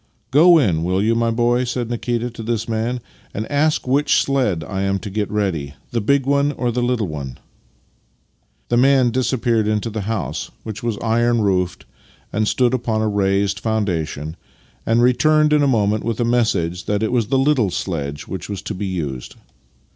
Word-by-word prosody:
" - - -43
Go 165 +5 +7
in, 90 - +2
will 90 +2 0
3' 110 +3 +2
ou, - - +3
my 115 0 +1
boy," 120 +2 +2
said 120 -1 -3
Nikita 120 0 -2
to 115 - -9
this 115 0 -2
man, 115 +2 -2 0.2
" - - -30
and 105 - -2
ask 150 -1 +1
which 140 +3 +3
sledge 125 - 0
1 95 +6 -3
am 100 0 +1
to 100 0 -7
get 105 0 -2
ready 85 -9 -2
— - - -36
the 115 - -1
big 140 +5 +2
one 140 +1 +2
or 125 -3 -1
the 120 +1 -1
httle 120 -4 0
one? 70 -5 -6 0.7
" - - -43
The 120 - +2
man 130 -1 +4
disappeared 120 -3 +1
into 110 +1 -1
the 110 0 -3
house 110 -3 -3
(which 110 -2 -6
was 115 -3 -2
iron 120 +1 +2
roofed 90 -3 0 0.5
and 105 0 +1
stood 125 +2 +2
upon 115 -3 0
a - - +1
raised 100 -1 +1
foundation), 85 -8 -2 0.5
and 115 +2 +3
returned 150 +4 +4
in 150 - +4
a 140 - +3
moment 105 -4 +1
with 115 -2 -2
a 120 - +1
message 110 -8 0
that 105 +1 0
it 110 - 0
was 120 -4 +1
the 135 - +1
little 135 -6 +2
sledge 75 -5 -4
which 95 0 -6
was 100 -1 -5
to 95 - -4
be 100 +2 -4
used. 75 -9 -4
115 Hz, 200 wpm, -20 LUFS, 100-125 Hz, 0.7 s, Go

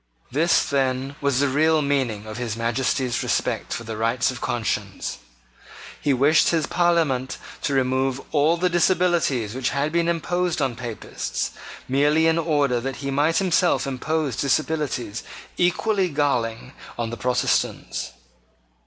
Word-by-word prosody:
This, 160 +6 +3
then, 135 0 -1
was 140 -2 +1
the 145 - +3
real 155 +3 +3
meaning 130 -7 0
of 110 +1 -7
his 115 -3 -3
Majesty's 120 +1 0
respect - - -1
for 115 - -3
the 115 -1 -5
rights 115 +3 +1
of 130 - -8
conscience. 105 -4 -2 0.8
He 145 - +1
wished 140 +5 +4
his 160 -3 +1
Parliament 160 -8 +1 0.2
to 140 - -1
remove 130 0 +1
all 155 +3 +3
the 180 +2 +2
disabilities 175 - +2
which 130 -1 -1
had 145 +2 -1
been 170 0 +1
imposed 175 +1 0
on 135 -4 0
Papists, 120 -2 -4 0.4
merely 145 +4 +3
in 165 0 +3
order 145 -6 +1
that 135 +2 -4
he 140 - -1
might 150 +4 +2
himself 175 -7 +2
impose 140 0 -1
disabilities 140 -5 -1 0.3
equally 185 +2 +1
galling 130 -5 -1 0.2
on 115 -1 -3
Protestants. 125 +2 -1
140 Hz, 135 wpm, -23 LUFS, 125-160 Hz, 0.8 s, wished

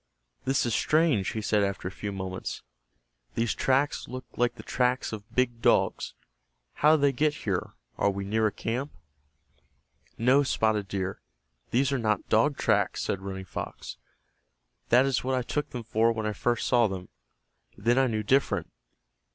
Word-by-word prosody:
"This 135 -1 +2
is 120 - 0
strange," 155 - +2
he 110 - -3
said 105 0 +2
after 100 -2 -1
a - - -4
few 100 +2 -5
moments. 95 -1 -5 0.7
"These 115 -3 +1
tracks 135 +2 +1
look 130 0 -7
like 120 0 +1
the - - -10
tracks 125 -2 0
of 105 0 -8
big 120 -2 +1
dogs. - - +2 0.6
How 150 +2 +5
did 155 - 0
they 140 - +5
get 150 +3 +1
here? 95 -4 -2 0.2
Are - - +3
we 100 0 -3
near 110 +2 +2
a - - -1
camp?" 125 +8 -3 1.2
"No, 130 +5 +4
Spotted 110 -6 +1
Deer, 95 -1 -3 0.5
these 130 +3 +2
are 140 - 0
not 110 -2 0
dog 135 +6 +3
tracks," - - +1
said 95 - -2
Running 95 -1 -6
Fox. - - -7 0.9
"That 125 +3 +6
is 135 -2 0
what 130 +1 0
I 125 - 0
took 150 +4 -2
them 125 -4 -6
for 115 +1 +2
when 110 -1 -3
I 105 - -1
first 120 +2 0
saw 120 -3 +4
them. 95 -2 -6 0.7
Then 120 +3 +2
I 135 - +4
knew 110 -2 -1
different. 135 +6 +1
115 Hz, 170 wpm, -28 LUFS, 105-130 Hz, 1.2 s, That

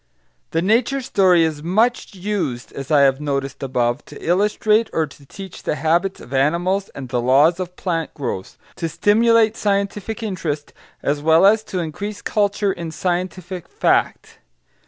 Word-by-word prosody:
The 165 - 0
nature 235 +7 +2
story 185 -8 +4
is 155 -2 -1
much 215 +7 0
used, 185 -11 -3
as 135 -1 -7
I 150 -2 +5
have 135 0 +3
noticed 140 -2 -3
above, 125 -2 -1
to - - -11
illustrate 210 +5 +2
or 160 - +1
to 140 -1 -16
teach 190 +4 -10
the - - -2
habits 170 +6 0
of 125 - -11
animals 175 +8 +1
and 135 -2 -6
the 120 0 0
laws 145 +8 +4
of 180 -1 -5
plant 165 -4 -2
growth; 120 -10 -5 0.2
to 165 -2 -2
stimulate 225 +4 +3
scientific 205 +2 -2
interest 165 -8 -4 0.3
as 145 +1 0
well 160 +4 +5
as 215 +2 +5
to 185 - -5
increase 200 +5 -4
culture 205 -1 +1
in 170 -1 -6
scientific 180 +1 -3
fact. - - 0
175 Hz, 155 wpm, -20 LUFS, 145-200 Hz, 0.3 s, I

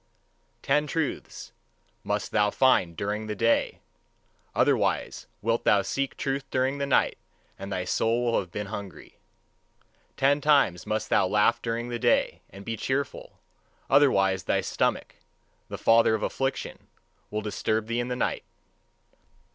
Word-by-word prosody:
Ten 150 +2 +2
truths 160 -1 -4 0.5
must - - -2
thou 105 0 +3
find 100 -9 +2
during 105 +2 -3
the 105 - -3
day; 115 +3 +1 0.7
otherwise - - +1 0.2
wilt 115 +1 0
thou 100 -1 +4
seek 135 +7 -3
truth 135 0 -2
during 130 +2 0
the 140 - -1
night, 140 - +2 0.4
and 100 +1 -7
thy 90 -1 -2
soul 115 +5 +1
will - - +2
have 90 -3 -7
been 105 +4 -4
hungry. 95 -6 -9 1.0
Ten 140 +2 +3
times 140 - +3
must 110 0 -2
thou - - +4
laugh 105 +4 +2
during 115 +1 -3
the 120 -1 -3
day, - - +1
and 100 +1 -12
be 115 - -3
cheerful; 135 +5 -3 0.5
otherwise 95 - +3
thy - - +1
stomach, - - -1 0.5
the - - -5
father 115 -1 +4
of 110 - -4
affliction, 135 0 -3 0.4
will 105 - -3
disturb 110 +1 -1
thee 115 +1 -2
in 120 - -2
the 125 - -2
night. - - -1
115 Hz, 145 wpm, -26 LUFS, 105-135 Hz, 1.0 s, thou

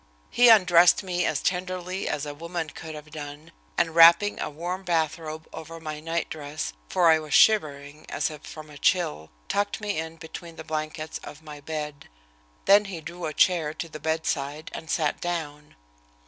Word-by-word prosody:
He 245 0 +6
undressed 180 -5 +6
me 180 -1 -1
as - - -1
tenderly 185 0 -2
as 145 - -2
a 145 - -5
woman 165 +1 -5
could 160 -1 -8
have 150 0 -11
done, 150 +1 -8 0.3
and, 165 -2 +1
wrapping 170 +5 +7
a - - -2
warm 175 +5 -4
bathrobe 160 -2 -2
over 165 +1 -8
my 155 -2 -6
nightdress, 155 -2 -4 0.2
for 170 -2 +5
I 160 - +4
was 155 -1 -2
shivering 150 -7 +3
as - - -1
if 150 -1 -10
from 155 -1 -10
a 145 - -12
chill, 80 - +1 0.2
tucked 205 0 -1
me 205 -5 -2
in 160 0 -5
between 165 +1 -9
the 160 - -8
blankets 155 0 -4
of 150 +2 -10
my 150 -2 -9
bed. 150 -1 -6 0.6
Then 205 +1 +6
he 190 -4 -6
drew 170 +2 -7
a 155 - -4
chair 160 -4 +3
to 165 - -5
the 155 -1 -9
bedside 155 -1 -2
and 160 - -8
sat 155 -4 0
down. 150 -4 -4
160 Hz, 175 wpm, -26 LUFS, 150-175 Hz, 0.6 s, wrapping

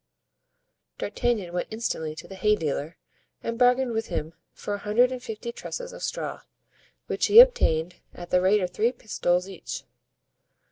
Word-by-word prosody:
D'Artagnan 210 -8 -1
went 175 - -2
instantly 160 -8 -3
to - - -10
the - - -10
hay 210 +3 +2
dealer 155 -2 -3 0.5
and 230 0 -3
bargained 250 0 +4
with 225 0 -2
him 160 +2 -4 0.2
for 205 - -5
a 205 - -3
hundred 225 +5 +3
and 255 -1 -5
fifty 225 0 -6
trusses - - -7
of - - -10
straw, - - -4 0.6
which - - 0
he 425 +3 +9
obtained, 180 - +5
at 175 0 -10
the 180 - +4
rate 195 +3 +4
of 180 - -2
three 225 +6 +1
pistoles 180 -6 -1
each. 190 -3 -7
210 Hz, 160 wpm, -26 LUFS, 175-240 Hz, 0.6 s, he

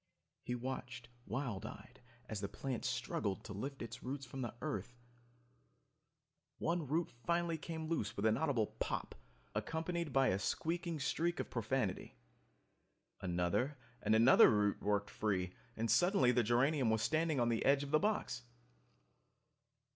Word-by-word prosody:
He 125 - -3
watched 125 -2 -5 0.2
wild 115 -2 -2
eyed - - -10 0.3
as 110 -3 -4
the 100 - -2
plant 130 -4 -4
struggled 115 -6 -1
to 105 - -7
lift 135 +7 -5
its 115 - -7
roots 135 +2 -4
from 135 +1 -6
the 120 -1 -4
earth... 110 +4 -4 1.6
One 170 -2 -1
root 160 +4 0
finally 170 +6 -1
came 160 0 -5
loose 165 0 -2
with 100 - 0
an 110 0 +5
audible 135 -5 +1
POP, - - -2 0.4
accompanied 165 -1 -2
by 135 0 +4
a 95 - +1
squeaking 165 - -1
streak 170 +5 0
of - - -3
profanity. 115 - -1 1.1
Another 90 +11 0 0.2
and 110 +1 +3
another 115 +4 +8
root 105 -2 +2
worked 100 0 0
free, 90 -4 -1 0.2
and 115 0 0
suddenly 175 -9 +5
the 125 0 +3
geranium 125 +3 +3
was 110 -1 +2
standing 155 -2 +1
on 120 -1 +3
the 115 -1 +1
edge 140 +1 +4
of 140 - -6
the 155 - +5
box. 205 - 0
125 Hz, 145 wpm, -37 LUFS, 110-155 Hz, 1.6 s, another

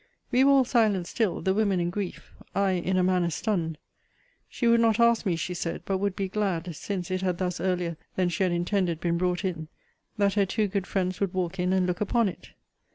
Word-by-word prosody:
We 255 +2 +4
were 275 - +5
all 270 -2 +5
silent 215 -7 +2
still, 215 0 -1
the 190 - +2
women 200 -3 +1
in 175 0 -1
grief; 195 -1 -5 0.2
I 200 -1 +2
in 185 +1 0
a 185 - +3
manner 180 -2 +2
stunned. 170 -3 -2 0.7
She 245 - -3
would 235 0 +5
not 225 -1 +3
ask 235 -2 +4
me, 175 - +2
she 170 +2 -3
said; 165 -1 -4
but 195 -1 -1
would 200 -1 -1
be 195 - -2
glad, 185 -4 -2
since 185 +2 -4
it 185 0 -1
had 180 -2 0
thus 180 -1 -2
earlier 180 -3 -1 0.2
than 185 -1 +1
she 175 - -3
had 185 -2 +3
intended 175 -1 0
been 170 0 0
brought 180 +1 0
in, 165 -4 -3 0.5
that 200 -1 +2
her 205 -2 +3
two 210 +2 0
good 195 -1 -2
friends 185 -2 -1
would 195 -2 -1
walk 185 0 -2
in 180 +1 +1
and 190 -1 +2
look 180 +1 -2
upon 225 +1 +2
it. - - -11
185 Hz, 225 wpm, -27 LUFS, 175-205 Hz, 0.7 s, were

